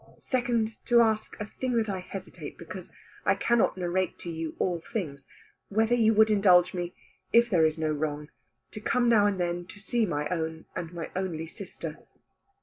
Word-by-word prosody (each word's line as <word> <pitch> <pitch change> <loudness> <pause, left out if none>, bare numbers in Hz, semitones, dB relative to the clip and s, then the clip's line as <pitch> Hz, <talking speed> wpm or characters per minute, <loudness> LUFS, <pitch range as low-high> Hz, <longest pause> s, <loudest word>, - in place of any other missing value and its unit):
Second 235 -4 -1
to 240 -1 +5
ask, 220 -1 0
a 210 - -3
thing 255 +4 -3
that 225 -1 +2
I 195 -2 -2
hesitate 185 +1 -8
because - - -8 0.3
I - - +3
cannot 235 -4 +2
narrate 180 0 -1
to 170 - -5
you 160 -1 -4
all 175 -3 0
things, 145 - -4 0.4
whether 220 +3 +2
you 225 -2 +5
would 220 0 +6
indulge 180 -4 +5
me, 175 -1 -4 0.4
if 235 0 +5
there 165 -4 +5
is 155 +1 -3
no 155 -1 0
wrong, 150 0 -2 0.4
to 215 - -7
come 245 +2 +2
now 215 -3 +5
and 200 -2 -1
then 175 0 -1
to 205 - -11
see 225 +2 0
my 150 -3 -1
own 160 -2 -3
and 165 -1 -4
my 170 -2 -6
only 180 -4 -2
sister." 165 - -8
185 Hz, 185 wpm, -28 LUFS, 165-220 Hz, 0.4 s, would